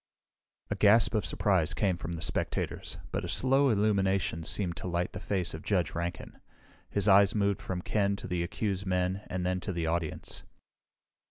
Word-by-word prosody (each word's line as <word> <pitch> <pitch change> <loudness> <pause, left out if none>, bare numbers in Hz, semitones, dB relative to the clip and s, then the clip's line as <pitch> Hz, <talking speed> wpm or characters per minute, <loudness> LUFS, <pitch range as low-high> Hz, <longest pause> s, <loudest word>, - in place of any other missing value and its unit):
A - - +1
gasp 110 +3 +5
of 110 - 0
surprise 90 -5 +1
came 95 -4 +1
from 85 0 -5
the 80 -1 -4
spectators, - - -2
but - - -2
a - - -4
slow 135 +2 +3
illumination 100 -6 +1
seemed 85 0 -1
to 85 - -5
light 85 0 -1
the - - -5
face 95 -4 -2
of 80 - -6
Judge 90 -5 0
Rankin. 85 +2 -5 0.5
His 100 0 0
eyes 100 0 +6
moved 100 -1 +1
from 90 -1 -4
Ken 100 -2 +1
to - - -8
the 90 -2 -1
accused 95 +2 -2
men 90 +1 0
and 90 -1 -3
then 90 0 0
to 95 - -4
the 85 -2 -2
audience. 80 -1 -2
95 Hz, 180 wpm, -30 LUFS, 85-100 Hz, 0.5 s, eyes